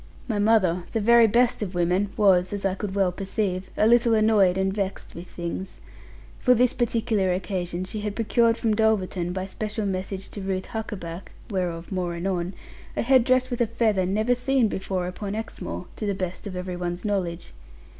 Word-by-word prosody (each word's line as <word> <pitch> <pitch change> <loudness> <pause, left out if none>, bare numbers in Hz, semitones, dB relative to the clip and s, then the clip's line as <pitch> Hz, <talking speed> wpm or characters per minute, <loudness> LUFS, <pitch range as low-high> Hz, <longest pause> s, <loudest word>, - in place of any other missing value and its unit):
My 220 -4 -1
mother, 195 -5 +3
the 225 - +1
very 235 +2 +6
best 235 +2 +2
of 190 -3 -4
women, 180 +3 +1
was 190 -3 +4
(as 200 -1 -3
I 195 - +2
could 195 0 -5
well 195 -2 +2
perceive) 190 0 -2
a - - +4
little 235 0 +5
annoyed 215 -4 +4
and 190 0 +1
vexed 195 -1 -3
with 170 +2 -9
things. 175 +2 -6 0.6
For 250 -1 +4
this 250 +1 +3
particular 225 -5 +1
occasion, 180 -1 -2
she 200 +3 -5
had 205 -1 -3
procured 230 0 +2
from 225 -2 +1
Dulverton, 195 -5 +1
by 185 +1 -3
special 210 +2 -4
message 190 0 -3
to 205 - -7
Ruth 190 -1 -2
Huckaback 195 -6 -6 0.2
(whereof 175 -3 -3
more 180 -2 -2
anon), 180 +1 -2 0.4
a - - +1
head 260 0 +5
dress 255 +1 +2
with 245 - -1
a 235 - +3
feather 215 -5 +1
never 215 +6 +2
seen 250 -1 +2
before 190 -2 -2
upon 195 +3 -4
Exmoor, 220 -4 -5
to 215 - -3
the 200 - 0
best 185 +1 -4
of 190 - -6
every 180 0 -4
one's 175 +1 -4
knowledge. 185 -5 -2
195 Hz, 185 wpm, -25 LUFS, 185-220 Hz, 0.6 s, very